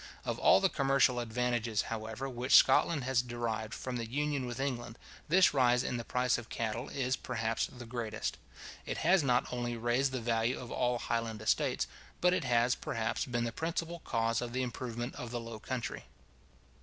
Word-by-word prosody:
Of - - -2
all - - +6
the 195 - +4
commercial 135 -5 +3
advantages, 120 -1 0
however, 110 +3 -4
which 125 0 +2
Scotland 140 +2 +5
has 130 -1 +2
derived 115 -2 -3
from 130 -1 -4
the 115 -1 -4
Union 145 0 -1
with 120 +1 -5
England, 120 -4 -3 0.3
this 185 +3 +5
rise 125 -2 +4
in 125 - -2
the 120 - -4
price 125 +1 +1
of 120 - -11
cattle 115 +3 -3
is, 130 -1 0
perhaps, 115 0 -2
the 120 -1 -10
greatest. 115 -2 -4 0.5
It - - -2
has 180 +1 +5
not 125 -4 +1
only 120 -1 -2
raised 120 +4 +1
the 130 - -2
value 115 +1 0
of 120 -2 -8
all 125 -1 +1
highland 115 -2 -2
estates, 105 - +1 0.3
but 180 0 +4
it - - 0
has, 120 +1 +3
perhaps, 115 0 -2
been 120 -1 -1
the 120 - -1
principal 165 +4 -3
cause 115 -5 0
of 120 -1 -4
the 130 +1 0
improvement 120 0 -4
of 125 - -5
the 120 0 -3
low 115 -1 -7
country. 125 +1 -4
120 Hz, 185 wpm, -32 LUFS, 115-130 Hz, 0.5 s, all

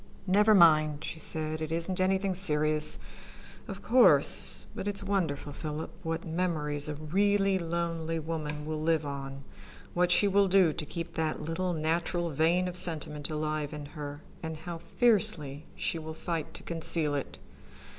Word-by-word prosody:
"Never 210 +3 +4
mind," 155 -4 +4
she 160 - -6
said. 155 0 -4
"It 155 0 -4
isn't 170 +3 -1
anything 190 +1 +1
serious, 155 -4 +2 0.7
of 200 -1 -8
course, 250 +3 +5
but - - -6
it's 205 0 +1
wonderful, 165 -8 -2
Philip, 155 0 -6
what 165 -1 -4
memories 155 -4 +1
a 150 - -4
really 195 +5 +1
lonely 165 -1 -3
woman 150 -2 -5
will 155 0 -4
live 160 -1 +1
on, 140 -1 -6 0.5
what 180 0 +2
she 200 +3 +5
will 200 0 +3
do 185 -4 +4
to 155 - -5
keep 170 +1 -6
that 155 -1 -2
little 175 +3 -2
natural 170 +2 -1
vein 165 +5 +1
of 180 0 -1
sentiment 150 -4 +2
alive 155 -1 -3
in 150 -1 -7
her, 145 -1 -7 0.2
and 160 -1 -5
how 165 +1 -7
fiercely 170 - 0
she 165 - -2
will 160 0 -8
fight 165 -2 -4
to - - -9
conceal 165 -2 -1
it. 140 - -4
165 Hz, 155 wpm, -29 LUFS, 155-180 Hz, 0.7 s, course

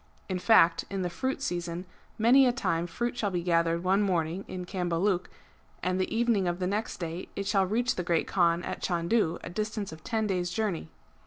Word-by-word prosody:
(In 185 -2 -2
fact 175 -5 +5
in 195 -1 -2
the 175 - -2
fruit 260 +10 -2
season 175 -5 -3 0.3
many 255 +4 +6
a - - +4
time 175 -9 -1
fruit 240 +8 -2
shall 215 -4 0
be 175 -2 -2
gathered 170 -1 +2
one 190 +2 +3
morning 180 -2 0
in 180 -1 -5
Cambaluc, 180 0 0 0.5
and 185 +1 0
the 185 - -2
evening 225 -4 +2
of 175 0 -1
the 180 - -2
next 205 +4 -2
day 170 +1 -5
it 200 - -3
shall 195 -1 +2
reach 235 +5 +1
the 180 - -3
Great 170 -2 +1
Kaan 170 -2 +2
at - - -5
Chandu, 170 0 +1
a - - -6
distance 215 0 -3
of 160 0 -11
ten 220 -2 -1
days' 180 -3 -1
journey. 180 -4 -2
185 Hz, 200 wpm, -29 LUFS, 170-215 Hz, 0.5 s, many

